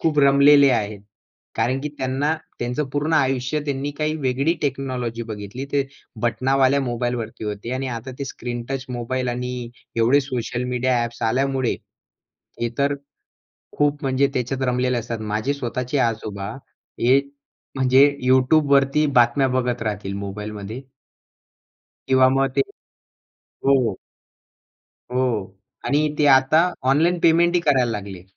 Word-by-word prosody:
खूप 155 Hz, -2 st, +1 dB
रमलेले 140 Hz, 0 st, +6 dB
आहेत. 105 Hz, -4 st, -1 dB, 0.5 s
कारण 125 Hz, +4 st, 0 dB
की 150 Hz, -, -3 dB
त्यांना 135 Hz, +4 st, 0 dB, 0.2 s
त्यांचं 125 Hz, +5 st, -2 dB
पूर्ण 145 Hz, +3 st, -1 dB
आयुष्य 135 Hz, +1 st, +1 dB
त्यांनी 140 Hz, 0 st, -2 dB
काही 155 Hz, 0 st, 0 dB
वेगळी 140 Hz, +3 st, 0 dB
टेक्नॉलॉजी 130 Hz, -4 st, -2 dB
बघितली. 105 Hz, +5 st, -6 dB
ते 140 Hz, -1 st, +1 dB, 0.4 s
बटनावाल्या 135 Hz, +3 st, +2 dB
मोबाईलवरती 120 Hz, -3 st, -3 dB
होते 105 Hz, +3 st, -4 dB
आणि 130 Hz, +1 st, -3 dB
आता 125 Hz, +3 st, -7 dB
ते 140 Hz, -, -3 dB
स्क्रीनटच 125 Hz, +1 st, -5 dB
मोबाईल 125 Hz, +1 st, -3 dB
आणि 125 Hz, +1 st, -3 dB, 0.5 s
एवढे 120 Hz, +5 st, +4 dB
सोशल 125 Hz, -2 st, -3 dB
मीडिया 125 Hz, +1 st, +1 dB
ॲप्स 120 Hz, 0 st, -6 dB
आल्यामुळे, 130 Hz, 0 st, 0 dB, 0.9 s
हे 120 Hz, -, 0 dB
तर 140 Hz, +1 st, +2 dB, 0.8 s
खूप 145 Hz, +1 st, +1 dB
म्हणजे 135 Hz, 0 st, +2 dB
त्याच्यात 130 Hz, +2 st, -2 dB
रमलेले 125 Hz, 0 st, +1 dB
असतात. 115 Hz, 0 st, -4 dB
माझे 110 Hz, +5 st, -1 dB
स्वतःचे 125 Hz, +1 st, -3 dB
आजोबा 105 Hz, -3 st, -4 dB, 0.5 s
हे 130 Hz, +3 st, +5 dB, 0.6 s
म्हणजे 130 Hz, +1 st, +5 dB, 0.2 s
YouTubeवरती 140 Hz, +2 st, +4 dB
बातम्या 120 Hz, +3 st, +4 dB
बघत 125 Hz, -2 st, -1 dB
राहतील 100 Hz, -3 st, -3 dB
मोबाईलमध्ये. 105 Hz, +3 st, -6 dB, 1.3 s
किंवा 130 Hz, -1 st, +5 dB
मग 135 Hz, 0 st, +1 dB
ते 140 Hz, -, +4 dB, 1.1 s
हो. 130 Hz, -7 st, +3 dB, 1.2 s
हो 130 Hz, -, +1 dB, 0.7 s
आणि 145 Hz, +1 st, +2 dB, 0.2 s
ते 150 Hz, -, +3 dB
आता 135 Hz, +5 st, +3 dB, 0.3 s
ऑनलाईन 170 Hz, +5 st, +2 dB
पेमेंट 170 Hz, +1 st, +4 dB
ही -, -, +4 dB
करायला 130 Hz, -5 st, +3 dB
लागले. 100 Hz, -4 st, -6 dB
130 Hz, 125 wpm, -22 LUFS, 120-140 Hz, 1.3 s, रमलेले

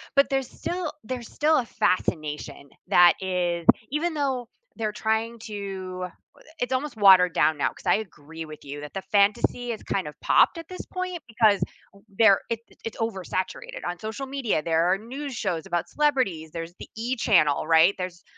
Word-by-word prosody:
but 275 Hz, +1 st, +5 dB
there's 270 Hz, -2 st, -1 dB
still 350 Hz, -3 st, -4 dB
there's 240 Hz, 0 st, -6 dB
still 310 Hz, +1 st, +3 dB
a 245 Hz, -, 0 dB
fascination 150 Hz, -7 st, -1 dB, 0.2 s
that 175 Hz, 0 st, +7 dB
is 175 Hz, -2 st, -1 dB, 0.3 s
even 320 Hz, +3 st, 0 dB
though 265 Hz, -5 st, -1 dB, 0.3 s
they're 215 Hz, -2 st, -2 dB
trying 220 Hz, +2 st, -1 dB
to 195 Hz, -4 st, -5 dB, 0.3 s
i -, -, -20 dB, 0.2 s
it's 245 Hz, +1 st, -1 dB
almost 260 Hz, -2 st, -2 dB
watered 185 Hz, -3 st, +7 dB
down 155 Hz, -1 st, +3 dB
now -, -, +2 dB
'cause -, -, -16 dB
I -, -, +4 dB
agree 160 Hz, +1 st, -10 dB
with 155 Hz, -1 st, -11 dB
you 145 Hz, +1 st, -7 dB
that 150 Hz, -, -9 dB
the 195 Hz, -, -3 dB
fantasy 210 Hz, +4 st, +2 dB
is 220 Hz, -, -6 dB
kind 190 Hz, -5 st, -2 dB
of 150 Hz, -, -8 dB
popped -, -, +4 dB
at 330 Hz, -1 st, -8 dB
this 365 Hz, -, -7 dB
point 365 Hz, -1 st, -4 dB
because 220 Hz, -3 st, +3 dB, 0.3 s
w 200 Hz, -, -20 dB, 0.2 s
there 200 Hz, -4 st, +7 dB
it 230 Hz, -1 st, -1 dB, 0.3 s
it's -, -, -7 dB
oversaturated. 190 Hz, -4 st, -3 dB
On 175 Hz, -, -5 dB
social 220 Hz, +5 st, -5 dB
media, 260 Hz, -, -1 dB
there 165 Hz, 0 st, +2 dB
are 190 Hz, -, +3 dB
news 265 Hz, +6 st, -6 dB
shows 165 Hz, -6 st, -2 dB
about 175 Hz, 0 st, -2 dB
celebrities. 250 Hz, -, +1 dB
There's 165 Hz, +1 st, -6 dB
the -, -, -9 dB
E! 245 Hz, +3 st, -1 dB
channel, 170 Hz, -, +3 dB
right? 165 Hz, +4 st, +6 dB
There's 180 Hz, -1 st, -5 dB
205 Hz, 185 wpm, -25 LUFS, 175-250 Hz, 0.3 s, that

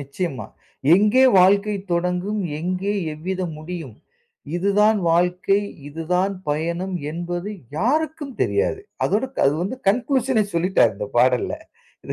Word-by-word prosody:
நிச்சயமா. 140 Hz, +1 st, -4 dB, 0.5 s
எங்கே 215 Hz, +7 st, +4 dB, 0.2 s
வாழ்க்கை 200 Hz, +2 st, +4 dB, 0.2 s
தொடங்கும்? 180 Hz, +4 st, -1 dB, 0.2 s
எங்கே 185 Hz, +4 st, -2 dB, 0.2 s
எவ்விதம் 175 Hz, +1 st, -4 dB
முடியும்? 155 Hz, -6 st, -7 dB, 0.6 s
இதுதான் 205 Hz, +3 st, +3 dB
வாழ்க்கை, 180 Hz, +4 st, +2 dB, 0.3 s
இதுதான் 180 Hz, +6 st, -1 dB
பயணம் 170 Hz, +5 st, -2 dB, 0.2 s
என்பது 175 Hz, +3 st, -4 dB, 0.3 s
யாருக்கும் 295 Hz, -, -1 dB
தெரியாது. 415 Hz, -1 st, +1 dB, 0.2 s
அதோட 210 Hz, +6 st, +1 dB, 0.2 s
அது 140 Hz, +2 st, +3 dB
வந்து 210 Hz, +8 st, -3 dB
கன்க்ளூஷனே 250 Hz, 0 st, +2 dB
சொல்லிட்டாரு 170 Hz, -, +3 dB
இந்த 105 Hz, -, -4 dB
பாடல்ல. 125 Hz, +1 st, +3 dB, 0.5 s
இத -, -, -4 dB
185 Hz, 110 wpm, -22 LUFS, 170-210 Hz, 0.6 s, எங்கே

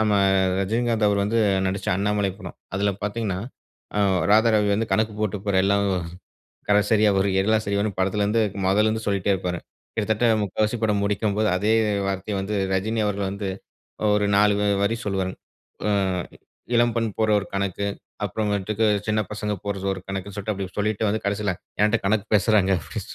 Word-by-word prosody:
நம்ம 110 Hz, -1 st, +2 dB, 0.5 s
ரஜினிகாந்த், 115 Hz, +2 st, +1 dB
அவர் 100 Hz, -1 st, +1 dB
வந்து 115 Hz, +3 st, 0 dB, 0.3 s
நடிச்ச 95 Hz, +1 st, -4 dB
அண்ணாமலை 100 Hz, 0 st, 0 dB
படம். 95 Hz, -5 st, -9 dB, 0.2 s
அதில 100 Hz, +1 st, +1 dB
பார்த்தீங்கன்னா, 105 Hz, -2 st, -2 dB, 0.6 s
அ -, -, +1 dB, 0.3 s
ராதாரவி 110 Hz, -1 st, +4 dB
வந்து 110 Hz, +2 st, 0 dB
கணக்கு 110 Hz, +2 st, +1 dB
போட்டு 105 Hz, -1 st, -1 dB
போற 100 Hz, -2 st, 0 dB
எல்லாம் 100 Hz, +1 st, +2 dB, 0.9 s
கடைசரியா 105 Hz, +1 st, +4 dB
ஒரு 95 Hz, -, +2 dB
எல 110 Hz, +3 st, +3 dB
சரின்னு 100 Hz, +1 st, 0 dB
படத்துலேருந்து 105 Hz, +3 st, +1 dB, 0.2 s
முதல்லேருந்து 110 Hz, +3 st, +2 dB
சொல்லிட்டே 100 Hz, -1 st, +1 dB
இருப்பாருங். 90 Hz, -2 st, -3 dB, 0.3 s
கிட்டத்தட்ட 110 Hz, +1 st, +1 dB, 0.2 s
முக்கால்வாசி 105 Hz, +3 st, 0 dB
படம் 105 Hz, -2 st, +2 dB
முடிக்கும்போது, 105 Hz, +1 st, 0 dB
அதே 105 Hz, +4 st, +2 dB, 0.3 s
வார்த்தையை 95 Hz, +1 st, -3 dB
வந்து 105 Hz, +2 st, -3 dB, 0.2 s
ரஜினி 110 Hz, +4 st, 0 dB
அவர்கள் 100 Hz, -1 st, -1 dB
வந்து, 100 Hz, 0 st, -4 dB, 0.7 s
ஒரு 105 Hz, 0 st, +2 dB
நாலு 105 Hz, 0 st, +4 dB, 0.3 s
வரி 105 Hz, +3 st, +1 dB
சொல்லுவாருங்க. 95 Hz, -2 st, -2 dB, 0.5 s
ஆ -, -, +2 dB, 0.8 s
இளம்பெண் 115 Hz, -1 st, +2 dB
போடுற 110 Hz, -1 st, +2 dB
ஒரு 100 Hz, -, -8 dB
கணக்கு, 100 Hz, 0 st, -1 dB, 0.4 s
அப்புறமேட்டுக்கு 105 Hz, +1 st, -1 dB, 0.2 s
சின்ன 110 Hz, 0 st, +1 dB
பசங்க 105 Hz, 0 st, -3 dB
போடுற 100 Hz, -1 st, -3 dB
ஒரு 95 Hz, -, -6 dB
கணக்குன்னு 95 Hz, +1 st, -5 dB
சொல்லிட்டு, 105 Hz, +1 st, -2 dB
அப்டி 95 Hz, -2 st, -6 dB
சொல்லிட்டு 105 Hz, +1 st, 0 dB
வந்து 110 Hz, +2 st, 0 dB
கடைசியில 100 Hz, -1 st, 0 dB, 0.3 s
"என்கிட்ட 105 Hz, +2 st, +3 dB
கணக்கு 105 Hz, +1 st, +1 dB
பேசுகிறாங்க" 105 Hz, -2 st, +3 dB
அப்டி -, -, -6 dB
105 Hz, 150 wpm, -24 LUFS, 100-110 Hz, 0.9 s, ராதாரவி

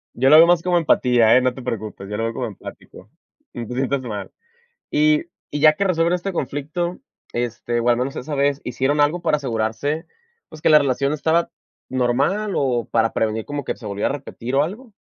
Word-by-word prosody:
Yo 130 Hz, +2 st, +3 dB
lo 155 Hz, -, +9 dB
veo 165 Hz, -, +9 dB
más 175 Hz, -1 st, +4 dB
como 180 Hz, 0 st, +1 dB
empatía, 125 Hz, -8 st, +4 dB
¿eh?, 130 Hz, -, +5 dB
no 130 Hz, 0 st, +1 dB
te 130 Hz, -, -9 dB
preocupes, 110 Hz, -5 st, -5 dB
yo 105 Hz, -, -4 dB
lo 115 Hz, -, -2 dB
veo 115 Hz, -, -2 dB
como -, -, -3 dB
empático, -, -, -11 dB, 0.4 s
no 120 Hz, -2 st, -6 dB
te 125 Hz, -, -6 dB
sientas 135 Hz, +2 st, -1 dB
mal. 105 Hz, -6 st, -6 dB, 0.6 s
Y 310 Hz, 0 st, +3 dB, 0.3 s
y 145 Hz, -, -1 dB
ya 155 Hz, +1 st, +6 dB
que 195 Hz, -, -1 dB
resuelven 170 Hz, -3 st, +1 dB
este 180 Hz, +2 st, -2 dB
conflicto, 160 Hz, +3 st, -3 dB, 0.3 s
este, 120 Hz, 0 st, -2 dB
o 120 Hz, -, +1 dB
al 120 Hz, -, +3 dB
menos 130 Hz, +2 st, -2 dB
esa 150 Hz, +4 st, -5 dB
vez, 140 Hz, 0 st, +1 dB
¿hicieron 135 Hz, +4 st, 0 dB
algo 155 Hz, +4 st, +2 dB
para 160 Hz, -, +2 dB
asegurarse, 130 Hz, +3 st, -2 dB, 0.4 s
pues 155 Hz, -2 st, -13 dB
que -, -, +3 dB
la 155 Hz, -1 st, +8 dB
relación 140 Hz, 0 st, 0 dB
estaba 160 Hz, +3 st, +1 dB, 0.4 s
normal 140 Hz, -, 0 dB
o 125 Hz, -4 st, 0 dB
para 115 Hz, -1 st, +2 dB
prevenir 110 Hz, 0 st, -1 dB
como 145 Hz, +1 st, -5 dB
que -, -, -2 dB
se 115 Hz, -, -13 dB
volviera 100 Hz, 0 st, -1 dB
a -, -, -2 dB
repetir 135 Hz, -2 st, -5 dB
o 140 Hz, -, +4 dB
algo? 220 Hz, +8 st, -7 dB
140 Hz, 210 wpm, -21 LUFS, 120-160 Hz, 0.6 s, lo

